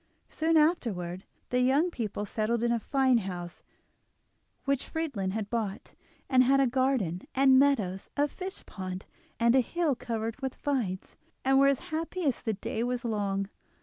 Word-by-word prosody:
Soon 320 +1 +2
afterwards 200 - +1 0.3
the 250 0 +2
young 280 +8 +3
people 210 -6 -3
settled 225 +3 -1
in 240 - +2
a 235 - +2
fine 260 0 +3
house 175 -3 -6 1.0
which 275 -1 0
Friedlin 285 - -2
had 215 -1 -2
bought, 215 -4 -3 0.3
and 255 -1 +5
had 270 +2 +4
a 275 - +5
garden 250 -9 +1
and 265 -1 +6
meadows, 215 -10 +1
a 290 +1 +3
fishpond, 190 - -7 0.3
and 235 +1 +4
a - - +7
hill 330 +4 0
covered 230 0 -4
with 265 -1 -3
vines, 230 -10 -2 0.3
and 270 0 +5
were 275 - +6
as 275 -1 +4 0.2
happy 330 +3 -2
as 270 -4 +1
the 220 - -1
day 215 +2 -4
was 245 0 -1
long. 200 -3 -1
245 Hz, 160 wpm, -29 LUFS, 205-275 Hz, 1.0 s, a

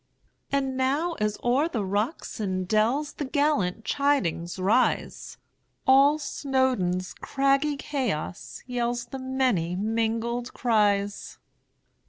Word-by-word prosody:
And 270 -1 0
now, 280 +7 0
as 210 0 0
o'er 260 +6 +2
the 225 - -2
rocks 210 - -2
and 185 -3 -2
dellsThe 260 +7 0
gallant 285 - +1
chidings 195 - 0
rise, 205 +7 0 0.5
All 275 +3 +6
Snowdon's 260 -11 -1
craggy 275 +2 +1
chaos 255 - -4
yellsThe 240 +1 -3
many 255 -10 0
mingled 230 +4 -1
cries! 205 -4 +1
245 Hz, 95 wpm, -26 LUFS, 205-275 Hz, 0.5 s, All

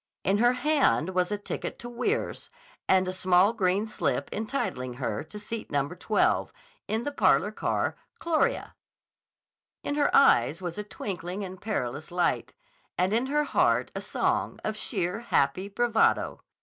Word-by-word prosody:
In 195 +2 +2
her 240 +2 +5
hand 265 - +2
was 180 +1 0
a 205 - 0
ticket 205 - -5
to 240 - -8
Weirs, 250 - -2 0.4
and 185 -1 +4
a 185 - -2
small 185 +3 +4
green 195 -1 +1
slip 220 - -2
entitling 205 - -3
her 120 -3 -3
to 210 - -10
seat 215 +2 -6
No. 140 -1 0
12 190 +5 +1 0.4
in 220 +2 -1
the 290 - -2
parlor - - +3
car - - -1 0.2
"Chorea." 340 +9 0 1.1
In - - -2
her 290 -1 +2
eyes 145 - +5
was 175 +1 -5
a - - -2
twinkling 185 -2 -5
and 185 -1 -8
perilous 145 - -3
light, 175 0 0 0.5
and 185 +3 +1
in 235 +4 +1
her 295 +2 +1
heart - - +2
a - - -4
song - - -1
of 215 - -2
sheer, 200 -3 -2
happy 185 -5 +1
bravado. 225 +1 +1
205 Hz, 155 wpm, -27 LUFS, 180-240 Hz, 1.1 s, her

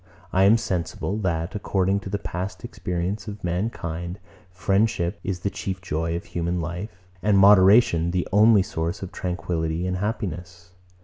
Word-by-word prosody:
I 95 +1 +5
am 110 +3 +6
sensible, 95 -2 -2
that, 85 -4 -1
according 100 -1 0
to 100 - -8
the 100 - -1
past 90 -1 -5
experience 95 -1 -3
of 105 0 -7
mankind, 85 -1 -3 0.3
friendship 95 0 0
is 95 -2 -3
the 100 - -1
chief 95 -2 -4
joy 85 -2 -2
of 85 - -5
human 85 +1 -2
life, 90 +2 -6 0.2
and 105 -2 +3
moderation 95 -2 +6
the 90 0 -1
only 105 0 +6
source 85 0 -3
of 95 - -6
tranquillity 85 -2 -2
and 90 0 -1
happiness. 90 -4 -4
90 Hz, 150 wpm, -24 LUFS, 85-100 Hz, 0.3 s, am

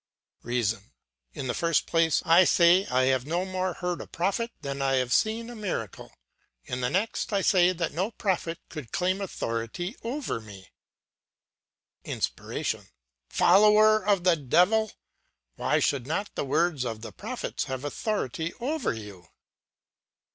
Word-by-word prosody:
"REASON: 115 -3 -2 0.4
In - - -4
the 125 - -1
first 165 +4 +1
place, 165 -1 +2
I 170 +3 +7
say 175 +2 +5
I 130 +1 +2
have 130 0 +1
no 175 +4 0
more 185 -1 -2
heard 180 -1 -3
a - - -9
prophet 200 +7 -1
than 140 0 -4
I 135 0 +1
have 125 -1 +1
seen 225 +1 +1
a 240 - -8
miracle. 180 - -5 0.5
In 125 0 -4
the 125 - +1
next, 200 - -1
I 200 -1 +1
say 180 -2 +4
that 170 -2 -3
no 185 +7 -1
prophet 185 -7 -2
could 150 -8 -8
claim 185 +2 0
authority 170 - -4
over 250 - -3
me. 100 -4 -13 1.3
"INSPIRATION: - - -3 0.4
Follower 215 +3 +5
of 200 -3 +2
the 180 -2 +5
devil! 180 - +3 0.6
Why - - +1
should 135 -3 0
not 200 +7 -2
the - - -3
words 155 0 +1
of 115 -3 -4
the 110 -1 -7
prophets - - -4
have 130 +1 -5
authority 165 - -2
over 280 - -1
you? 100 -6 -10
170 Hz, 145 wpm, -27 LUFS, 130-195 Hz, 1.3 s, I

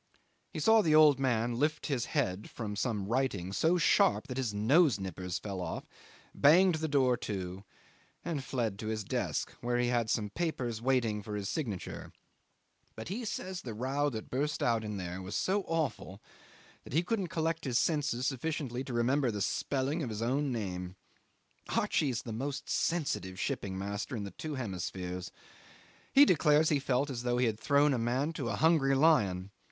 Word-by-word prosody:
He - - -6
saw 220 0 +5
the 155 -5 +3
old 150 -3 +7
man 120 -2 0
lift 150 +2 0
his 130 -5 -1
head 110 - -1
from 105 -3 -5
some 105 -3 -1
writing 105 -7 -1
so 165 - +3
sharp 190 +4 +3
that 125 - -4
his 130 -5 -1
nose 125 - +3
nippers 90 -1 -4
fell 100 -3 -5
off, - - -4 0.5
banged 175 +6 +6
the 160 - 0
door 135 -4 +3
to, 95 -4 -5 0.6
and 160 -6 -2
fled 115 -7 -2
to 110 - -5
his 110 -1 -2
desk, - - -2
where 120 0 0
he 120 0 +1
had 120 -2 +1
some 105 -2 0
papers 125 -9 -2
waiting 120 -5 +1
for 105 +1 -6
his 100 -2 -3
signature: 110 - -4 0.8
but 110 +7 -7
he 225 +6 -3
says 190 -4 -4
the 115 -4 -6
row 135 +5 0
that 110 -5 -7
burst 145 +4 -1
out 115 -2 +2
in 105 -1 -4
there 90 0 -5
was 95 +2 -6
so 200 +2 +1
awful 145 - -2 0.6
that - - -11
he 165 +4 +3
couldn't 195 0 -1
collect 165 0 -1
his 125 -4 0
senses 145 -5 0
sufficiently 135 -2 -2
to 130 - -6
remember 130 +3 +2
the 105 -2 -3
spelling 140 - -1
of 130 - -3
his 110 +1 -3
own 135 +4 0
name. 90 -5 -4 0.8
Archie's 130 -6 +1
the 115 - -6
most 140 +4 -4
sensitive 140 - -1
shipping 95 -1 -2
master 100 +5 -4
in 105 - -3
the 100 - -6
two 155 - -6
hemispheres. 90 -5 -4 0.8
He 280 +1 +8
declares 155 - +4
he 145 - +2
felt 135 +1 0
as 120 -3 -4
though 120 0 0
he 125 - +3
had 110 -2 -1
thrown 145 +4 +3
a 125 - 0
man 130 +7 0
to 135 -7 -3
a - - -1
hungry 150 -4 +3
lion. 100 - +3
125 Hz, 180 wpm, -31 LUFS, 105-150 Hz, 0.8 s, He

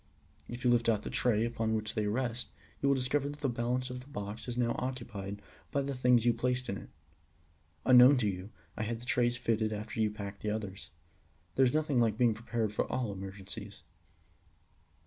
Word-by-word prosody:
If 120 +1 -6
you 125 - +4
lift 115 -1 +3
out 105 -2 +2
the - - -5
tray 115 -2 +2
upon 115 -1 -1
which 110 -1 -2
they 105 -1 0
rest, 120 +2 -1 0.3
you 140 - +3
will 140 - +5
discover 135 +2 0
that 145 +1 -9
the 140 - +1
balance 125 +1 -1
of 125 - -5
the 125 - -13
box 105 -4 -6
is 120 -1 -4
now 120 -1 +2
occupied 115 -6 -4 0.3
by 140 - +1
the 140 0 -2
things 125 -2 +4
you 120 - +5
placed 125 +1 -1
in 100 - -2
it. - - -12 1.0
Unknown 130 +2 +8
to 115 -4 +1
you, 95 0 -3 0.3
I - - -4
had 115 +1 -2
the 120 - -10
trays 120 -1 +2
fitted 110 -2 0
after 105 +1 -5
you 110 -1 +3
had 105 - -11
packed 100 0 -6
the 105 - -1
others. 100 -2 -4 0.6
There 135 - +5
is 125 - +2
nothing 150 -4 +2
like 110 -3 +2
being 120 -2 +4
prepared 115 -1 -2
for - - -1
all 125 -5 -1
emergencies. 95 0 -8
120 Hz, 205 wpm, -32 LUFS, 105-125 Hz, 1.0 s, Unknown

